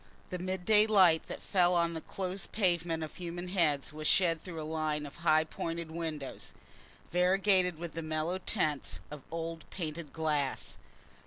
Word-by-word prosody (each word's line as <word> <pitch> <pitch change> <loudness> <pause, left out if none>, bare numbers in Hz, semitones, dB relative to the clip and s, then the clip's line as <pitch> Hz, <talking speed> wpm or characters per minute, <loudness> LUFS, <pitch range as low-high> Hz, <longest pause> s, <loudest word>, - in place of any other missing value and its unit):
The 180 - -3
midday 190 +4 +3
light 185 -7 +5
that - - -7
fell 180 -2 +3
on 170 -1 +2
the 160 - -4
close 190 +2 -4
pavement 170 -5 0
of 155 - -7
human 175 0 -5
heads 155 -6 +1
was 155 0 -3
shed 165 -4 +3
through 170 -3 -6
a - - -3
line 155 -1 -1
of 145 - -10
high 155 -2 +4
pointed 165 +1 -4
windows, 160 -4 -5 0.6
variegated 180 0 +3
with 170 -1 -6
the 165 - -3
mellow 155 +3 -1
tints 150 - 0
of 150 -1 -7
old 165 -1 -5
painted 160 -4 -5
glass. 150 -4 -1
165 Hz, 160 wpm, -32 LUFS, 155-180 Hz, 0.6 s, light